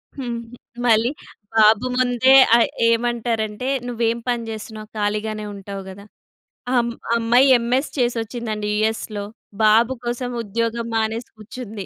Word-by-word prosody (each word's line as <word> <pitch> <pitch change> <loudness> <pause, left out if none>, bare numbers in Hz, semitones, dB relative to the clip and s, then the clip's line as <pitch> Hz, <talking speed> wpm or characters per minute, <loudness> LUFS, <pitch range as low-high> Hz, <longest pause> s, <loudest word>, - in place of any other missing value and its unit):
హ్మ్. 245 -4 -4
హ్మ్. 245 - -13 0.3
మళ్ళీ 230 +1 +3 0.4
బాబు 220 +2 +5
ముందే 255 +1 +4 0.2
ఆ - - +7 0.3
ఏమంటారంటే 230 -1 -1 0.2
"నువ్వేం 235 -1 -1
పని 240 -1 0
చేస్తున్నావు? 215 0 -7
ఖాళీగానే 215 +1 -2
ఉంటావు 195 0 -7
గదా!" 200 +2 -11 0.7
అమ్ 235 0 +1 0.2
అమ్మాయి 235 +3 +4
ఎంఎస్ 245 +5 0
చేసొచ్చిందండి 230 -3 -2
యూఎస్‌లో. 215 -1 -2 0.4
బాబు 225 +4 +5
కోసం 245 +1 -3
ఉద్యోగం 230 +2 -2
మానేసి 225 +1 -1
కుర్చుంది. 215 -2 -8
230 Hz, 115 wpm, -21 LUFS, 215-240 Hz, 0.7 s, ఆ